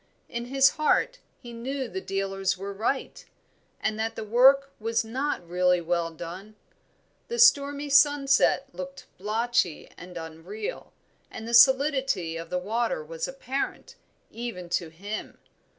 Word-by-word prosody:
In 235 0 -5
his 270 +3 +3
heart - - +2 0.2
he 240 -3 -11
knew 260 +3 -4
the 380 - -5
dealers 195 - -2
were 200 +1 -6
right, 225 +7 -2 0.6
and 215 0 -2
that 225 0 -2
the - - -5
work 265 +5 +5
was 225 +1 0
not 250 -5 -3
really 180 +1 +2
well 170 0 -1
done. 175 +6 -9 0.7
The 475 - -4
stormy 285 -10 +4
sunset 275 -1 +4
looked 185 +1 -8
blotchy 220 -3 -1
and 180 0 -10
unreal, 165 +6 -7 0.4
and 220 - -8
the 235 - -5
solidity 265 - +4
of 165 0 -6
the 180 - -1
water 215 -3 -1
was 160 +1 -4
apparent, 270 - -4 0.4
even 220 -7 -6
to 175 -1 -1
him. 200 +7 -7
220 Hz, 135 wpm, -27 LUFS, 180-270 Hz, 0.7 s, work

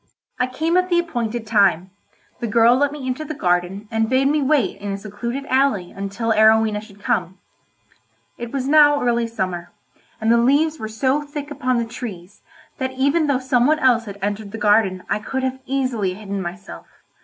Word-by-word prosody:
I 250 - +2
came 320 +7 0
at 365 0 +1
the 345 - +2
appointed 240 -9 -2
time; 195 -4 +2 0.5
the 240 - -3
girl 230 +2 +5
let 285 +2 +1
me 290 -3 -7
into 260 +4 -3
the 310 0 -6
garden 180 +1 -1
and 225 0 0
bade 260 +1 +3
me 300 +1 +2
wait 275 -5 +1
in 205 0 -4
a 195 - -3
secluded 235 +7 -5
alley 260 -10 +1
until 200 +4 -3
Arowhena 220 -1 +4
should 205 -2 -16
come. 190 -7 -1 1.0
It 235 -1 -7
was 270 -2 -2
now 290 -1 +5
early 235 -1 +1
summer, 185 -6 -4 0.5
and 220 +1 +1
the 235 - +5
leaves 295 +6 +2
were 220 - -5
so 260 +6 0
thick 290 0 -7
upon 255 -3 -1
the 235 - 0
trees 205 -5 -8 0.4
that 260 -1 -2
even 280 +4 +1
though 280 -2 +2
some 255 -1 +2
one 310 +1 +3
else 245 -5 +3
had 200 -2 -8
entered 205 0 -3
the - - -4
garden 205 -3 +2
I - - 0
could 265 +5 -4
have 260 0 -2
easily 250 -8 -1
hidden 200 -1 -5
myself. 180 +2 -8
235 Hz, 190 wpm, -21 LUFS, 205-270 Hz, 1.0 s, girl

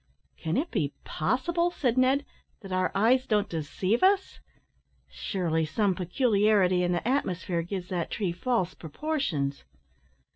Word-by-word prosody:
"Can 160 +1 -2
it 325 +5 -1
be 145 -3 -1
possible," 335 - 0
said 255 -9 0
Ned, 260 +2 +3 0.4
"that 195 - -10
our 185 0 +1
eyes 250 +6 +3
don't 210 -2 +2
deceive 180 +7 -1
us! 385 +1 +2 0.7
Surely 165 -5 -1
some 195 +5 +1
peculiarity 200 -1 +2
in 175 0 +1
the 175 +5 -1
atmosphere 185 -10 0
gives 180 +1 -5
that 175 -3 -2
tree 195 -5 -1
false 185 0 -1
proportions?" 160 - -2
195 Hz, 135 wpm, -28 LUFS, 175-255 Hz, 0.7 s, Ned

